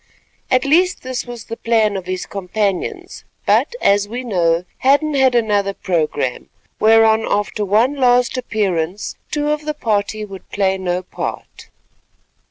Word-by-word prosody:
At 255 0 +2
least 355 +6 +2
this 255 0 -4
was 240 -2 -7
the 230 - -7
plan 220 -3 +1
of 185 -2 -5
his 185 0 -3
companions; 195 0 -3 0.2
but, 485 - +2
as 200 0 +3
we 245 +4 -5
know, 175 -6 +1
Hadden 285 +3 +3
had 265 -3 +3
another 205 -4 +1
programme, 155 -8 -2 0.3
whereon 220 0 +5
after 205 +1 -1
one 220 +7 +2
last 250 -2 +2
appearance 200 -6 -2
two 295 0 -1
of 300 0 -2
the 305 0 -3
party 215 -4 -1
would 195 -2 -11
play 190 -1 0
no 180 0 -2
part. - - -7
215 Hz, 145 wpm, -18 LUFS, 195-255 Hz, 0.3 s, whereon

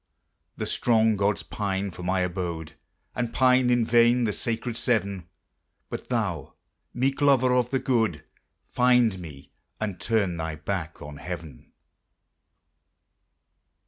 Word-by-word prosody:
The - - -2
strong 110 -2 +2
gods 100 -3 0
pine 95 +5 -3
for 90 - -10
my 90 +1 0
abode, 85 -4 -3 0.4
And 120 -2 -2
pine 130 -1 +4
in 120 -2 +3
vain 120 +1 +4
the 105 -2 0
sacred 115 +2 -3
Seven; 100 -7 -1 0.6
But - - -6
thou, - - -2 0.4
meek 135 +3 -1
lover 130 -3 +4
of 125 -1 +2
the 135 - +1
good! 110 - 0 0.4
Find 125 -5 +3
me, 75 -6 -11 0.3
and 100 -5 -3
turn 100 -7 0
thy 80 -1 -3
back 80 0 -4
on 75 0 -9
heaven. 85 -2 -8
105 Hz, 125 wpm, -26 LUFS, 90-120 Hz, 0.6 s, pine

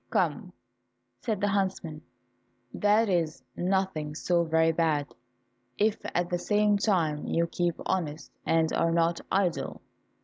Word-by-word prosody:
"Come," - - 0 0.7
said 215 -4 -2
the 205 - +2
huntsman, 190 -6 -1 0.7
"that 210 +2 +3
is 165 -8 0
nothing 180 -5 -1
so 170 +1 +1
very 160 0 +3
bad, 155 -3 0 0.6
if 215 +1 +2 0.2
at 175 0 +1
the 175 - 0
same 210 +1 +2
time 165 -8 +1
you 170 - +1
keep 170 0 -1
honest, 160 -5 -2
and 160 -1 +2
are 165 0 +2
not 170 0 +1
idle." 185 -3 0
170 Hz, 130 wpm, -28 LUFS, 160-195 Hz, 0.7 s, that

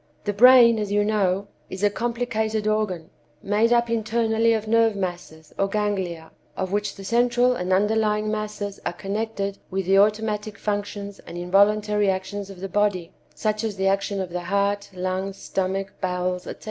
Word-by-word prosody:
The 205 - -1
brain, 235 +1 +7
as 205 -1 -3
you 205 0 +2
know, 200 -2 +1 0.2
is 190 +2 -6
a 205 - +4
complicated 220 -2 -2
organ, 210 -6 -1 0.3
made 215 +3 +2
up 240 0 +3
internally 225 0 +1
of 220 -1 0
nerve 225 -1 +3
masses, 175 -5 -6
or 195 - +2
ganglia, 190 -6 -2 0.3
of 185 -1 -2
which 205 0 -1
the 195 - -10
central 245 +3 +2
and 180 -4 -3
underlying 210 +2 +2
masses 210 -2 -4
are - - -2
connected 200 +1 -3
with 190 -1 -2
the 195 +2 +4
automatic 210 0 +1
functions 205 -1 -4
and 175 - -10
involuntary 205 +3 +2
actions 190 +1 -3
of 190 -2 -11
the 195 - -3
body 200 -4 0 0.2
(such 215 +7 -1
as 220 -3 -2
the 190 0 -2
action 195 +1 0
of 185 -2 -4
the 180 0 -3
heart, 200 +2 0
lungs, 185 +1 -3
stomach, 195 +1 -3
bowels, 180 -1 -2
etc.) - - -7
205 Hz, 170 wpm, -24 LUFS, 190-215 Hz, 0.3 s, brain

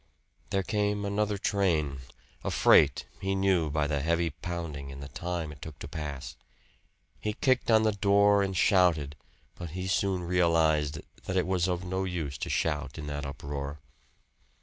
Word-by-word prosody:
There 95 0 0
came 105 0 0
another 105 +1 0
train, 85 -9 0 0.4
a - - -1
freight, - - +5
he 95 +1 -1
knew 95 -5 +2
by 75 0 0
the 75 -1 0
heavy 85 +3 +1
pounding 80 -5 -5
and 70 - -9
the 70 0 -8
time 85 -3 -4
it 70 -1 -13
took 80 -3 -8
to - - -7
pass. 70 -5 -6 0.8
He 105 - -2
kicked 130 +2 +1
on 110 -1 +5
the 110 - +3
door 100 0 +4
and 95 -1 -1
shouted, 85 -7 +3 0.4
but 85 -1 -7
he 90 - -3
soon 95 -1 0
realized 80 -4 +2 0.2
that 95 - -1
it 90 - +2
was 90 -1 +1
of 90 -1 -1
no 95 +1 -1
use 85 -7 -3
to - - -3
shout 75 -3 -1
in 75 - -5
that 75 -1 -4
uproar. 70 0 -5
85 Hz, 170 wpm, -29 LUFS, 75-95 Hz, 0.8 s, freight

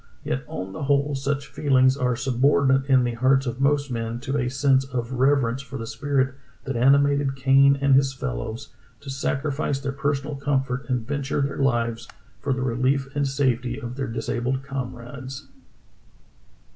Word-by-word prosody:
Yet 70 0 -2
on 95 +2 -6
the - - -7
whole 140 +1 +2
such 140 +1 -2
feelings 130 -2 +3
are 125 -3 0
subordinate 135 +2 +2
in 130 -2 +5
the 120 -1 -1
hearts 130 +3 +2
of 125 +1 -4
most 140 -1 +2
men 115 0 -3
to 135 +1 -3
a 125 -3 0
sense 135 0 +3
of 125 -2 -4
reverence 130 -1 +2
for 135 0 -8
the 115 - -5
spirit 130 +3 0 0.3
that 135 - -4
animated 140 +2 +3
Kane 135 +1 +5
and 140 0 +3
his 135 0 +4
fellows 110 - -5 0.3
to 140 - -7
sacrifice 140 +1 -1
their 140 0 -3
personal 140 +1 -2
comfort 135 -1 -1
and 125 -3 -1
venture 140 0 -1
their 140 0 -2
lives 120 -4 0 0.3
for 145 - -2
the 130 -1 -1
relief 135 +3 0
and 140 -1 +1
safety 130 -2 0
of 120 -2 -6
their 135 0 -3
disabled 120 +3 -2
comrades. 130 0 -7
135 Hz, 165 wpm, -24 LUFS, 125-140 Hz, 0.3 s, in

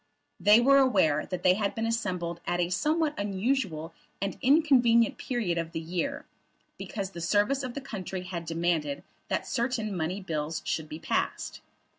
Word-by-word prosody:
They 210 +2 +7
were 275 +3 +6
aware 185 - +3
that 180 - -4
they 180 - +6
had 200 +1 -1
been 225 - -1
assembled 180 -7 -2
at 175 0 0
a 175 0 0
somewhat 305 - +1
unusual 195 - -1 0.3
and 195 0 -2
inconvenient 255 -5 +4
period 210 -10 -1
of 165 0 -4
the - - -2
year, 180 - -3 0.5
because 195 -2 -4
the 170 - -7
service 210 +10 +2
of 255 -2 -5
the 280 - -4
country 190 -8 -5
had 175 -2 -5
demanded 165 -3 -1 0.2
that - - -1
certain 235 -5 -1
money 175 +3 -2
bills 155 -4 -3
should 155 -1 -2
be 155 - -6
passed. 165 - -2
195 Hz, 165 wpm, -28 LUFS, 170-240 Hz, 0.5 s, They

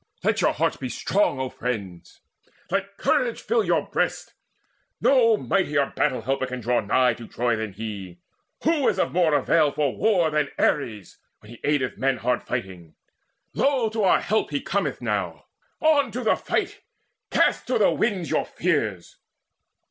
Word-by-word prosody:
Let - - +1
your - - +3
hearts - - 0
Be 130 - -5
strong, 190 -1 0
O 130 -1 -2
friends: 100 -10 -6 0.5
let 200 0 -2
courage 240 -2 +1
fill 225 +1 +1
your 170 -5 +1
breasts. - - -2 0.7
No 230 -5 +4
mightier 150 -9 0
battle 125 - +1
helper 135 +2 -1
can 125 0 -5
draw 120 +1 +1
nigh 125 +4 +2
To 115 - -10
Troy 120 -1 0
than 110 -3 -4
he. 100 -4 -7 0.5
Who 315 -3 +2
is - - +1
of - - 0
more 170 -4 +3
avail 150 +2 +3
For 145 -3 -1
war 180 -6 +2
than 150 -2 0
Ares, 110 - -1 0.2
when 105 - -16
he 120 - -12
aideth 145 -3 0
men 135 -1 +1
Hard 125 +2 0
fighting? 95 -9 -6 0.6
Lo, 270 -5 +1
to 220 0 -2
our 190 - +4
help 220 +2 0
he 145 -1 -1
cometh 200 +7 -2
now! - - -2 0.4
On 295 -4 +3
to 250 +2 -3
the 220 - +3
fight! - - -2 0.5
Cast - - +2
to - - +1
the - - +4
winds 190 -7 -1
your - - 0
fears!" 115 - -2
145 Hz, 165 wpm, -24 LUFS, 120-200 Hz, 0.7 s, No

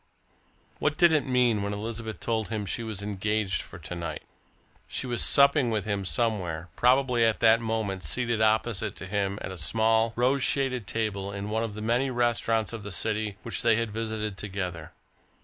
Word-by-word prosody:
What 150 0 0
did 175 -1 +6
it 150 -4 +2
mean 125 -4 +3
when 100 0 -2
Elizabeth 110 +1 -5
told 110 -3 -1
him 110 -2 -3
she 100 - -2
was 110 -3 -5
engaged 105 -1 -1
for - - -11
to - - -7
night? 85 -3 -5 0.6
She - - -3
was 120 -2 -1
supping 140 -2 +5
with 110 -3 -1
him 100 -2 -2
somewhere 90 -7 -1
probably 125 -1 +3
at 110 -1 +2
that 115 0 +6
moment 110 -4 -2
seated 120 - -1
opposite 110 0 +1
to - - -7
him 100 0 -1
at - - -4
a 95 - -8
small, 110 +8 +2
rose 130 +3 +2
shaded 125 -5 0
table 100 -3 -2
in 100 +1 -5
one 110 +1 0
of 110 -3 -3
the 105 - -6
many 120 +4 +1
restaurants 120 -3 +1
of 115 - -5
the 100 0 -7
city 105 +1 -2
which 115 - -2
they 115 -2 +4
had 115 -1 -1
visited 110 -2 -3
together. 90 -5 -5
110 Hz, 185 wpm, -27 LUFS, 100-120 Hz, 0.6 s, did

